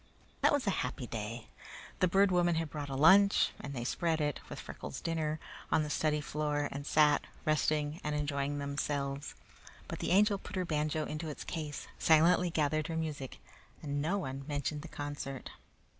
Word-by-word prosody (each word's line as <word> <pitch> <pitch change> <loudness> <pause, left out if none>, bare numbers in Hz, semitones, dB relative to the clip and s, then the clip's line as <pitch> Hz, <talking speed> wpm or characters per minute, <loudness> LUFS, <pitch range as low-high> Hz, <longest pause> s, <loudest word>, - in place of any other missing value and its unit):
That - - +5
was 285 -3 +1
a 200 - +2
happy 125 0 -3
day. 115 0 -5 0.5
The 185 - +4
Bird 195 +2 +4
Woman 175 -1 +3
had 160 -2 -2
brought 145 -2 -5
a 135 - -3
lunch, 195 +8 +6
and 140 - -6
they 120 - -3
spread 165 +5 0
it, 145 -2 0
with - - -6
Freckles' - - -7
dinner, 155 -2 -1 0.3
on 155 - +4
the 150 - -4
study 150 -1 +1
floor 145 0 -1
and 140 +1 -5
sat, 150 -1 +4 0.2
resting 155 0 +1
and 150 0 -1
enjoying 145 -1 -1
themselves. 140 0 -2 0.5
But - - -5
the - - -2
Angel 200 +1 +4
put - - -8
her 185 -1 0
banjo 155 -1 0
into 155 +1 -4
its 150 - -6
case, 150 -3 -5
silently 170 +3 +5
gathered 155 -1 +1
her 165 -2 -3
music, 150 -5 -4 0.5
and 145 -1 -1
no 170 +7 +1
one 135 -7 -4
mentioned 145 0 -2
the 165 - -8
concert. 145 -3 -5
150 Hz, 180 wpm, -33 LUFS, 145-165 Hz, 0.5 s, lunch